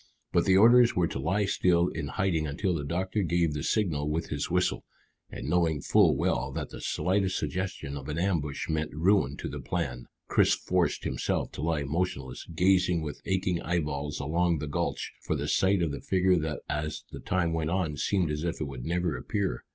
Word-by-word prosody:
But - - +3
the 95 0 +5
orders 120 +3 +6
were 90 - +3
to - - -4
lie 95 +9 +1
still 90 -2 +2
in 80 -3 -4
hiding 80 -1 0
until 90 +6 -1
the 75 -4 -2
doctor 95 +7 -1
gave 85 -3 +1
the 75 - -3
signal 75 -9 0
with 80 +2 -2
his 70 -1 -2
whistle, 90 +1 +1 0.5
and 60 - -7
knowing 80 -2 +2
full - - +4
well 65 +1 0
that - - -4
the - - -8
slightest 95 0 0
suggestion 95 -7 -3
of 70 +1 -7
an 75 - -3
ambush 85 -6 -1
meant 80 -1 -2
ruin 95 +5 +2
to - - -5
the - - -6
plan, - - -3 0.2
Chris - - +4
forced - - 0
himself 65 - -1
to - - -7
lie 80 -2 0
motionless, 70 -4 -3
gazing 90 0 +2
with 75 -2 -6
aching 95 -2 0
eyeballs 75 -4 -2
along 85 +4 +1
the 75 - -4
gulch 70 - -2
for - - -1
the - - -3
sight 95 -1 +2
of 80 - 0
the 70 - -5
figure 95 -1 +2
that 75 -1 -3
as 75 0 -3
the - - -7
time 85 -2 0
went 80 -1 -1
on 85 -4 -1
seemed 90 +2 0
as 75 +1 -3
if 85 0 -2
it 75 - -1
would 65 -3 -7
never 85 0 -1
appear. 100 -2 -2
85 Hz, 200 wpm, -28 LUFS, 75-95 Hz, 0.5 s, orders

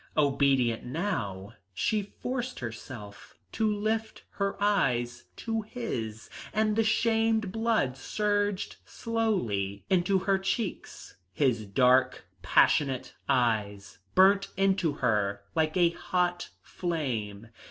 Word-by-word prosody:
Obedient 135 -5 +2
now, 115 - -3 0.2
she 215 - +1
forced 250 +5 -5
herself 110 -3 -8 0.2
to 220 -1 +1
lift 220 +1 -2
her 200 -1 -2
eyes 120 -12 +1
to 225 -1 -2
his, 120 - -5 0.2
and 215 -1 +1
the 225 - +3
shamed 225 -2 +2
blood 225 - +1
surged 205 +6 -1
slowly 120 - -2
into 190 +1 +3
her 190 +1 +1
cheeks. 195 +1 -4 0.2
His 120 -7 +1
dark, 130 +4 +3 0.2
passionate 135 -3 +2 0.2
eyes 105 -7 0 0.2
burnt 195 +1 +5
into 190 -5 +2
her 100 -6 0
like 160 +1 +1
a 175 -2 +4
hot 175 0 -1
flame. 115 - -3
170 Hz, 105 wpm, -28 LUFS, -, 0.2 s, burnt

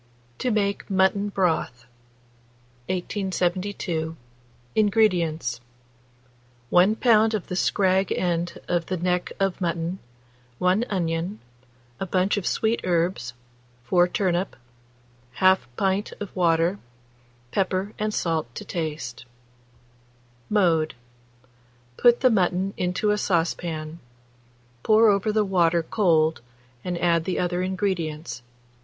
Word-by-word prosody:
TO 255 - 0
MAKE 200 -3 -1
MUTTON 195 +1 +2
BROTH. 165 -10 -1 1.0
1872. 180 -3 -2 0.6
INGREDIENTS. 175 - +1 1.1
1 185 +5 +5
lb. 225 -2 +4
of 205 - -3
the 180 - -5
scrag 190 0 +2
end 175 -1 -1
of 175 -2 0
the 185 - -2
neck 180 +1 -1
of 195 -1 0
mutton, 170 +1 -2 0.6
1 185 - +2
onion, 175 +1 -2 0.6
a 195 - -3
bunch 185 +2 +1
of 205 -4 -2
sweet 225 +1 0
herbs, 170 -9 -1 0.5
4 175 +7 +3
turnip, 180 0 -1 0.8
1/2 190 0 +5 0.2
pints 195 +1 0
of 205 - -8
water, 170 +1 +2 0.7
pepper 190 +1 -1
and 215 0 0
salt 160 - -2
to - - -7
taste. 150 -8 -5 1.2
Mode. 170 -7 +2 1.0
Put 240 -1 +5
the 255 -2 +5
mutton 190 -1 +1
into 180 +4 0
a 210 - 0
stewpan; 165 -3 -1 0.8
pour 220 - +5
over 200 +1 +1
the 210 0 +2
water 170 -3 +2
cold 160 - +2 0.4
and 180 -1 -3
add 170 -2 +2
the 185 - -1
other 175 0 0
ingredients. 175 -7 -2
180 Hz, 110 wpm, -24 LUFS, 165-200 Hz, 1.2 s, 1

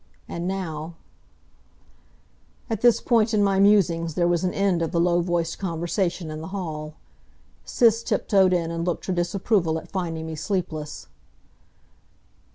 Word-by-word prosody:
And 170 +1 -4
now 165 -4 -4 1.8
At 220 -2 -2
this 240 -1 +5
point 225 -2 +2
in 205 - +3
my 195 -1 +2
musings 170 -6 +3
there 175 -1 +2
was 175 0 +1
an 180 - +1
end 195 -3 +1
of 165 -2 -1
the 170 - 0
low 175 0 +3
voiced 170 -1 -1
conversation 175 -1 -2
in 155 0 -6
the 160 - -6
hall. 155 -6 -5 0.7
Sis 230 -1 +3
tiptoed 195 -5 +2
in 170 -2 0
and 170 0 -3
looked 175 -1 -2
her 190 - -1
disapproval 175 -1 0
at - - -9
finding 165 -4 -3
me 160 - -5
sleepless. 155 -2 -4
175 Hz, 150 wpm, -24 LUFS, 165-195 Hz, 1.8 s, this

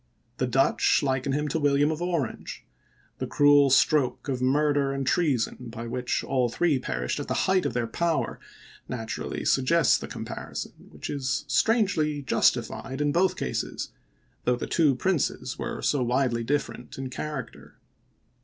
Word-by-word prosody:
the 130 - 0
Dutch 135 +4 +3
liken 130 0 0
him 150 +2 0
to 160 - -1
William 145 +1 +3
of 160 +1 -4
Orange; 170 -10 -3 0.5
the - - -2
cruel 145 -1 +5
stroke 135 +1 +3
of 130 -2 -2
murder 145 +1 +2
and 135 0 -2
treason 130 -5 0
by 115 +1 -7
which 125 +1 -2
all 130 -2 +1
three 150 +2 +1
perished 60 - -3
in - - -5
the - - -1
height 185 -1 +2
of - - -4
their 120 -1 0
power 165 +8 -1 0.5
naturally 115 -3 -4
suggests 145 +4 +3
the - - -6
comparison, - - -6 0.2
which - - -8
is 140 -1 -2
strangely 155 - +2
justi - - +3
fied 135 +1 -7
in 145 0 +1
both 185 +4 +2
cases, 60 - -3 0.6
though 125 - +3
the 120 - -4
two 150 -5 +3
princes 180 +3 -1
were - - -4
so 145 - +2
widely 120 -1 +1
different 120 -2 -3
in 130 -1 -5
character. 150 0 -6
140 Hz, 155 wpm, -26 LUFS, 125-150 Hz, 0.6 s, cruel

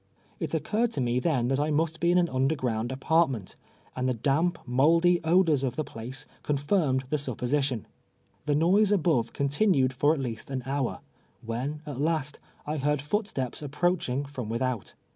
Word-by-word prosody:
It - - -2
occurred 230 +2 0
to - - -3
me 125 -1 +1
then 125 -5 +1
that 135 +1 +1
I 150 +1 +1
must 160 +2 0
Ijc 170 - +3
in 175 - +4
an 175 -1 +3
underground 130 -4 0
ai)artment, 135 - +1 0.4
and 130 0 0
the 125 - 0
damp, 145 +9 +1
mouldy 165 +8 +4
odoi 170 0 +3
s 140 - +1
of 130 -3 -1
the 155 - -1
})lace 120 +4 -6 0.2
confirmed 145 -2 +1
the 150 - +1
supposition. 130 -1 -1 0.6
The 145 - +3
noise 190 +7 +4
above 160 - +2
continued 140 -2 +2
for 145 +4 +3
at - - -5
least 115 -4 -5
an 130 -2 -3
hour, 135 -1 -2 0.4
when, 135 +7 -3
at 140 -3 -5
last, 155 -2 0 0.3
I 150 +1 -2
heard 145 +1 +1
footsteps 150 - -2
approaching 145 -2 0
from 130 -6 -6
without. 115 -1 -2
140 Hz, 170 wpm, -28 LUFS, 130-160 Hz, 0.6 s, in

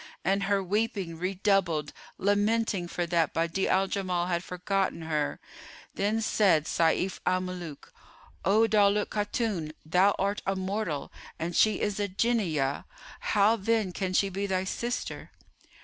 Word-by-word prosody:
'" - - -32
And 195 +1 +2
her 200 0 +1
weeping 195 -4 -1
redoubled, 185 -4 +1 0.2
lamenting 205 -1 +1
for 175 0 -2
that 165 -2 +1
Badi'a 165 +3 0
al 190 +1 +3
Jamal 185 -3 -1
had 175 -1 -1
forgotten 180 -1 -1
her.[FN#421] 155 -2 -5
Then 215 +3 0
said 190 -8 +3
Sayf 170 +3 +1
al 185 0 +1
Muluk, 180 -5 -7 0.5
"O 210 +5 +4
Daulat 205 -1 +3
Khatun, 205 -6 -2
thou 185 +5 +3
art 200 +2 -1
a 195 - +1
mortal 190 -5 -3 0.3
and 170 +1 -3
she 215 -1 +4
is 210 -1 -1
a 205 - 0
Jinniyah: 185 - 0 0.3
how 210 +2 +3
then 220 -2 0
can 185 0 -3
she 195 +2 +3
be 195 +2 -3
thy 185 -1 0
sister?" 240 +6 -4
190 Hz, 145 wpm, -28 LUFS, 175-205 Hz, 0.5 s, O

